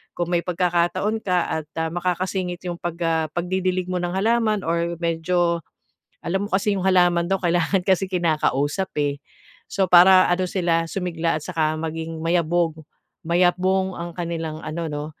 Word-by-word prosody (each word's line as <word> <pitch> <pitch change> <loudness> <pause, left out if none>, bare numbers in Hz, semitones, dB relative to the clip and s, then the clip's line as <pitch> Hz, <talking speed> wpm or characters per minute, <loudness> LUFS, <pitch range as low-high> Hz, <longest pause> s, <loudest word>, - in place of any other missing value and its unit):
Kung 175 0 -2
may 175 - +3
pagkakataon 180 +4 0
ka 180 -3 +1 0.2
at, 150 - -19
ah, 160 0 0
makakasingit 180 +1 -2
'yong 175 -1 -4
pag 175 -1 -4
ah, 160 -1 +1
pagdidilig 185 +1 -1
mo 180 - -1
ng 175 0 -2
halaman 215 0 +1
or 170 +1 -1
medyo 170 +1 0 0.6
alam 190 +4 -1
mo - - -19
kasi 200 +1 +2
'yong - - -3
halaman 175 -2 +3
daw 195 +1 +1
kailangan 175 +2 +1
kasi 190 0 +2
kinakausap 155 -1 0 0.2
eh. 145 0 -2 0.5
So, 195 -1 0
para 185 +1 +8
ano 185 +1 +1
sila 170 -3 0
sumigla 165 -3 -2
at - - -12
saka 160 -3 0
maging 160 0 -5
mayabong, 170 0 +1 0.5
mayabong 185 +2 +1
ang 170 0 -5
kanilang 165 -3 -4
ano 165 +1 -4
'no, 145 0 -4
175 Hz, 160 wpm, -23 LUFS, 165-185 Hz, 0.6 s, para